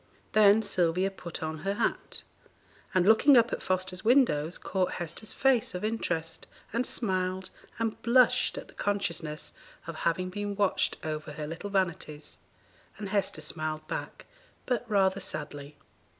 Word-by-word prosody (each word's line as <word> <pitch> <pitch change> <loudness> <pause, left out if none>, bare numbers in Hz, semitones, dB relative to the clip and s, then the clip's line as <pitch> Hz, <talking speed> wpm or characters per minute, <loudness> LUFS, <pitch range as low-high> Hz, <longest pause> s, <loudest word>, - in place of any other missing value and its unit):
Then 215 0 +6
Sylvia 185 -1 +1
put 170 -4 -7
on 160 0 -3
her 195 +4 -1
hat, - - -1 0.7
and, 185 -1 +3
looking 235 +6 +7
up 235 0 +4
at - - -2
Foster's 185 0 -2
windows, 220 - +3
caught 185 -2 -1
Hester's 175 +5 -5
face 255 -7 +2
of 180 - -2
interest, 170 -7 -2 0.3
and 240 +2 0
smiled 185 -3 -1 0.3
and 225 -1 -2
blushed 250 - +4
at - - -6
the - - -16
consciousness 170 -6 -2 0.3
of 165 -2 -6
having 185 +3 0
been 205 +1 -3
watched 200 -1 +1
over 155 -1 -4
her 150 +1 -5
little 165 +6 -6
vanities, 170 -6 -2 0.6
and 205 -2 -5
Hester 200 -5 0
smiled 155 0 -4
back, - - -5 0.4
but 245 -3 -1
rather 195 -2 +3
sadly. 145 -4 -6
185 Hz, 145 wpm, -29 LUFS, 160-210 Hz, 0.7 s, looking